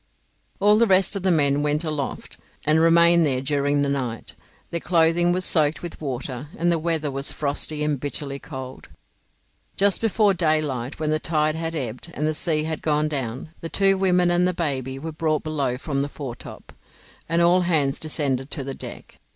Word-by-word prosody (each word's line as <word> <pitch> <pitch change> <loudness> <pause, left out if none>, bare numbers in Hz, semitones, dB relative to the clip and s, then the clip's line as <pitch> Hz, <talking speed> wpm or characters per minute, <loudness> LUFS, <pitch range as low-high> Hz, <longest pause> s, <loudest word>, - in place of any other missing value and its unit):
All 210 +1 +5
the 235 - +4
rest 190 +1 +4
of 200 - -3
the 190 - +1
men 145 -4 +3
went 150 +2 0
aloft, 150 -4 -4 0.3
and 155 +1 +3
remained 170 +1 +5
there 135 -4 +1
during 145 +1 0
the - - 0
night. 130 -5 -3 0.4
Their 170 - -1
clothing 170 0 +2
was 185 +1 0
soaked 155 -1 +2
with 175 - -8
water, 130 -1 -5
and 175 +1 +1
the 170 - +1
weather 155 -3 -1
was 135 +1 -3
frosty 150 +1 -2
and 150 -2 0
bitterly 140 0 -4
cold. 130 -4 -9 0.9
Just 200 -1 +2
before 215 -2 +3
daylight, 155 -7 -1
when 155 -1 -1
the 155 - +1
tide 155 -1 +1
had 165 +1 -4
ebbed, 125 +1 -5
and 150 - -1
the 155 - +1
sea 155 0 +1
had 160 -1 -4
gone 150 0 +1
down, 130 -1 -4
the 165 - -5
two 195 +1 +3
women 180 -2 +2
and 175 +1 +3
the 180 - -1
baby 135 -5 -2
were 160 +4 -6
brought 155 -1 -1
below 140 -5 -2
from 140 0 -3
the 140 +1 -1
foretop, 135 -5 -9 0.6
and 170 +1 +2
all 175 +2 +4
hands 155 -6 +1
descended 140 -4 0
to 145 - -3
the 135 0 -5
deck. - - -10
155 Hz, 190 wpm, -23 LUFS, 140-170 Hz, 0.9 s, All